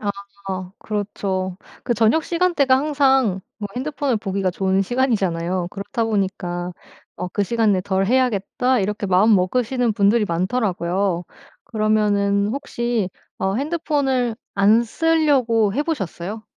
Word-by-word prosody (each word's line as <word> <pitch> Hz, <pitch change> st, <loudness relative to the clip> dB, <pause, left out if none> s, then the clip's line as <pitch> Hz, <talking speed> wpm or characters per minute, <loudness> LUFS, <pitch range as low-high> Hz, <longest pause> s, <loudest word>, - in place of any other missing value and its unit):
아. 205 Hz, -, -1 dB, 0.7 s
그렇죠. 195 Hz, -3 st, -3 dB, 0.3 s
그 240 Hz, -, +1 dB
저녁 230 Hz, +8 st, +3 dB
시간대가 335 Hz, -7 st, +2 dB
항상 270 Hz, -8 st, +2 dB, 0.2 s
뭐 205 Hz, -, -3 dB
핸드폰을 280 Hz, -2 st, -1 dB
보기가 195 Hz, -2 st, -1 dB
좋은 190 Hz, +1 st, +1 dB
시간이잖아요. 185 Hz, -7 st, 0 dB
그렇다 205 Hz, +4 st, -3 dB
보니까 185 Hz, -4 st, -2 dB, 0.4 s
어 180 Hz, -, -4 dB
'그 205 Hz, -, -1 dB
시간에 215 Hz, -2 st, +2 dB
덜 190 Hz, 0 st, 0 dB
해야겠다.' 250 Hz, +1 st, +1 dB
이렇게 205 Hz, +1 st, -2 dB
마음 195 Hz, +4 st, +4 dB
먹으시는 240 Hz, +5 st, +1 dB
분들이 205 Hz, +2 st, +3 dB
많더라고요. 180 Hz, -1 st, -1 dB, 0.4 s
그러면은 205 Hz, -2 st, +1 dB
혹시 235 Hz, -6 st, -2 dB, 0.3 s
어 190 Hz, 0 st, 0 dB
핸드폰을 275 Hz, -5 st, 0 dB, 0.2 s
안 210 Hz, +4 st, +5 dB
쓰려고 265 Hz, -7 st, +2 dB
해 290 Hz, -, +1 dB
보셨어요? 215 Hz, -, -4 dB
215 Hz, 295 characters per minute, -21 LUFS, 195-255 Hz, 0.7 s, 안